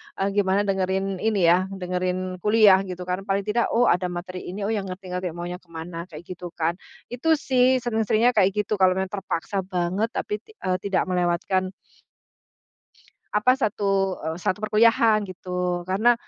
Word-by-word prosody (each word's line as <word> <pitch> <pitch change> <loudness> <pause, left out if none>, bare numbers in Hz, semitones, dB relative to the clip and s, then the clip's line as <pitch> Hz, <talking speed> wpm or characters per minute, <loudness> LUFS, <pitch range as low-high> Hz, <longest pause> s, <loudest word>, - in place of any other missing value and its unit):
eee, 195 +1 0
gimana 200 0 +2
dengerin 190 -1 -1
ini 215 -4 +1
ya, 180 +3 +4
dengerin 185 0 -3
kuliah 210 -1 +6
gitu 180 0 -6
karena 185 +3 -4
paling 195 +1 0
tidak, 215 +4 +1
"Oh 245 - +4
ada 180 +1 +1
materi 180 +1 -6
ini, 195 +3 -5
oh 210 - -1
ya 220 - 0
ngerti-ngerti 185 -2 -5
maunya 175 +1 -5
ke 180 - -31
mana," 165 +1 -7
kayak 160 -2 -10
gitu 180 0 -8
kan. 165 +2 -1 0.3
Itu 320 +6 +2
sih 255 -3 +2
sering-seringnya 225 0 +2
kayak 210 -1 +2
gitu 210 0 -3
kalau 185 -1 +4
memang 190 0 -2
terpaksa 195 -1 -3
banget 185 +2 -1
tapi 210 0 -2
ti 440 - -21
eee, 185 0 0
tidak 195 0 0
melewatkan 180 +2 0 1.6
apa, 250 +5 +3
satu, 195 -5 0
eee, 160 +1 -3
satu 185 +2 -1
perkuliahan 215 0 +4
gitu 180 -1 -3
karena, 215 +6 +4
190 Hz, 165 wpm, -24 LUFS, 180-210 Hz, 1.6 s, kuliah